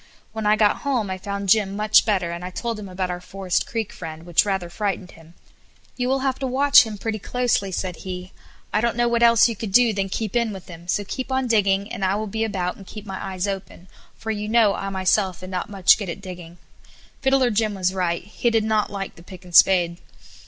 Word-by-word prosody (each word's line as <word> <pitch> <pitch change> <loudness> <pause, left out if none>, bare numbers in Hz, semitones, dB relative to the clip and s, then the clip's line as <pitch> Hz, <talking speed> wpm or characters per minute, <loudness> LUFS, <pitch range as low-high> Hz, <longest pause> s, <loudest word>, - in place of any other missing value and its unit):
When 220 -2 -2
I 210 - +5
got 210 -1 +3
home 245 -9 -1
I 185 - -4
found 200 0 -4
Jim 200 -1 +3
much 215 +1 +4
better, 185 -5 +1
and 170 +1 -6
I 180 - -4
told 230 +4 -4
him 200 -2 -8
about 185 0 -3
our 175 0 -5
Forest 185 -1 -2
Creek 225 -3 -3
friend, 160 -1 -8
which 175 +2 +3
rather 190 -3 -1
frightened 190 0 -3
him. 165 +1 -17 0.6
"You 250 0 -1
will 265 0 +1
have 265 -1 -1
to 270 - -2
watch 275 -1 +6
him 215 -1 -6
pretty 220 +1 -3
closely," 235 -3 0
said 180 -1 -3
he. 185 0 -7 0.4
"I 215 - +2
don't 235 0 0
know 240 0 +2
what 235 0 +1
else 235 0 +6
you 230 - -3
could 210 -1 -5
do 240 +1 +5
than 195 -1 -2
keep 215 +2 -3
in 235 -2 +1
with 190 -2 -10
him; 170 0 -11
so 205 +3 0
keep 260 +6 -5
on 260 0 +1
digging, 200 -3 +1
and 195 - -4
I 190 +1 +2
will 215 +1 -2
be 220 +2 -2
about 185 -5 -2
and 195 - -13
keep 215 -1 -9
my 195 -2 -6
eyes 190 0 -3
open, 195 -2 -6 0.3
for 220 - -4
you 210 0 -3
know 220 -3 +4
I 195 - -4
myself 190 -1 0
am 185 - -8
not 180 +1 -3
much 195 +1 +4
good 200 -4 -4
at 170 - -5
digging." 180 -3 -10 0.6
Fiddler 265 -2 +3
Jim 215 -1 0
was 185 -1 0
right; 175 -3 -1
he 210 +4 -1
did 225 -2 +2
not 215 -1 +1
like 195 -1 -5
the - - -13
pick 185 +1 -12
and 175 - -13
spade. 175 -2 +5
200 Hz, 240 wpm, -23 LUFS, 185-225 Hz, 0.6 s, watch